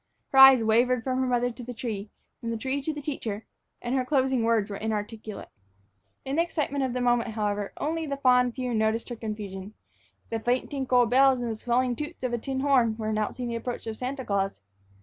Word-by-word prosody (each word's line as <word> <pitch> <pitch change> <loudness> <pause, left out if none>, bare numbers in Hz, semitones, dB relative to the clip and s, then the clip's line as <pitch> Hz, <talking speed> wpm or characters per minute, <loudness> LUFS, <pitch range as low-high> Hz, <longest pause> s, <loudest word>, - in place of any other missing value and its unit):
Her 270 - +3
eyes 265 -3 +9
wavered 235 +2 +3
from 255 0 -1
her 260 - +1
mother 245 0 +1
to 245 - -10
the 245 +1 -7
tree, 215 -3 -4 0.3
from 230 - -5
the 230 - -2
tree 265 +5 -2
to 315 - -2
the 295 -1 -7
teacher, 225 -7 -4 0.4
and 240 - -2
her 260 -1 +2
closing 265 -2 +1
words 225 -2 +1
were - - -3
inarticulate. 215 0 -4 0.8
In 270 +3 -2
the - - +5
excitement 295 -5 -1
of 260 -2 -1
the 250 - -2
moment, 240 -2 +1
however, 205 -2 -1
only 320 +1 -2
the 280 -1 -3
fond 250 -2 +3
few 250 -2 -2
noticed 220 +2 0
her 240 - -4
confusion. 210 -2 -6 0.6
The 225 - -1
faint 245 +3 0
tinkle 260 -3 +3
of 235 - -2
bells 265 0 +5
and 240 -1 -2
the - - -3
swelling 245 +2 0
toots 300 +2 -7
of 250 -1 -1
a 240 - 0
tin 265 +3 -3
horn 250 -6 +3
were 215 -1 -3
announcing 215 +3 -2
the 235 - -3
approach 245 +1 -5
of 225 -1 -4
Santa 260 +2 -4
Claus. 195 -1 -1
245 Hz, 220 wpm, -27 LUFS, 220-265 Hz, 0.8 s, eyes